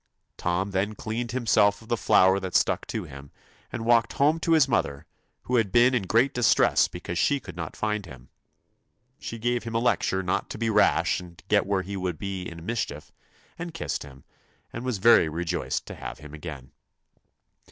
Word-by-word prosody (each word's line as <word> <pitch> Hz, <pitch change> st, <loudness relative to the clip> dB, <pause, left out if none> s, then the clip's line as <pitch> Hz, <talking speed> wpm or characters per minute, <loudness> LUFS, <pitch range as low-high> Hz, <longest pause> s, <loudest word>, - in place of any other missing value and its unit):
Tom 90 Hz, +3 st, -1 dB
then 100 Hz, +3 st, -1 dB
cleaned 115 Hz, +3 st, -4 dB
himself 105 Hz, -5 st, +3 dB
of -, -, -17 dB
the 120 Hz, -, +1 dB
flour 95 Hz, -3 st, +4 dB
that 95 Hz, -2 st, -6 dB
stuck -, -, +2 dB
to -, -, -3 dB
him, 70 Hz, +1 st, -11 dB, 0.4 s
and 115 Hz, -1 st, -5 dB
walked 115 Hz, -1 st, +3 dB
home 150 Hz, +4 st, +2 dB
to 165 Hz, 0 st, +1 dB
his 155 Hz, -4 st, +5 dB
mother, 80 Hz, -, -1 dB, 0.4 s
who 125 Hz, -, 0 dB
had 110 Hz, -5 st, +1 dB
been 120 Hz, +2 st, +5 dB
in 110 Hz, -7 st, 0 dB
great 120 Hz, +7 st, +3 dB
distress 120 Hz, -2 st, +4 dB
because 85 Hz, 0 st, -5 dB
she 140 Hz, -, +2 dB
could 95 Hz, -9 st, -11 dB
not 85 Hz, -2 st, -6 dB
find 105 Hz, -3 st, -2 dB
him. 60 Hz, -6 st, -13 dB, 0.9 s
She 115 Hz, -, -6 dB
gave 120 Hz, +2 st, -1 dB
him 115 Hz, -1 st, -6 dB
a -, -, +3 dB
lecture 95 Hz, -5 st, +1 dB
not 90 Hz, -, -1 dB
to -, -, -6 dB
be 115 Hz, 0 st, 0 dB
rash 105 Hz, -1 st, +3 dB
and 90 Hz, -1 st, -12 dB
get 100 Hz, -2 st, +3 dB
where 100 Hz, -2 st, 0 dB
he 100 Hz, +2 st, -6 dB
would 90 Hz, -3 st, -3 dB
be 95 Hz, +2 st, -5 dB
in 85 Hz, 0 st, -10 dB
mis 115 Hz, +1 st, 0 dB
chief, 75 Hz, +1 st, -9 dB, 0.5 s
and 170 Hz, -1 st, -6 dB
kissed -, -, -3 dB
him, 65 Hz, -2 st, -12 dB, 0.5 s
and 115 Hz, -, -5 dB
was 125 Hz, -4 st, -2 dB
very 95 Hz, -5 st, +5 dB
rejoiced 85 Hz, +2 st, -3 dB
to -, -, -8 dB
have -, -, -7 dB
him 75 Hz, +1 st, -12 dB
again. 75 Hz, -5 st, -8 dB
100 Hz, 195 wpm, -26 LUFS, 85-120 Hz, 0.9 s, his